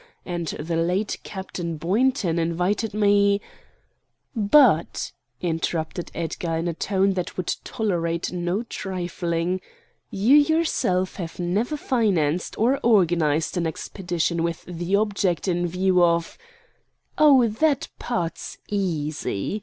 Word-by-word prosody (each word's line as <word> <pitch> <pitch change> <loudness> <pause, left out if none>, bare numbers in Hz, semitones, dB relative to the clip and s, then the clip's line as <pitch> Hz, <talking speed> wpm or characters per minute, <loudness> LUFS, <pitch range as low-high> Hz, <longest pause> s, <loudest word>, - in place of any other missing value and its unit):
And 175 -2 -3
the 165 +3 -3
late 180 +5 0
Captain 175 -4 -5
Boynton 190 - +1
invited 180 +6 0
me——" 200 -1 +3 1.0
"But," 215 - +4 0.3
interrupted 165 0 -2
Edgar 165 0 -2
in 165 +2 -2
a 170 - -1
tone 195 +3 +1
that 180 -2 -4
would 185 - -1
tolerate 170 -6 -1
no 180 +4 -1
trifling, 180 -3 -3 0.5
"you 220 +8 +4
yourself 290 - +1
have 170 -4 -6
never 200 - -1
financed 185 - 0
or 255 +5 +2
organized 170 -7 +2
an 170 -2 0
expedition 170 0 -2
with 170 0 -3
the 175 +2 -2
object 200 -4 0
in 175 -1 +1
view 180 +1 +2
of——" 170 -1 +1 0.8
"Oh, 275 -6 +6
that 280 +6 +1
part's 175 -9 -3
easy!" 160 - -2
180 Hz, 115 wpm, -24 LUFS, 170-205 Hz, 1.0 s, Oh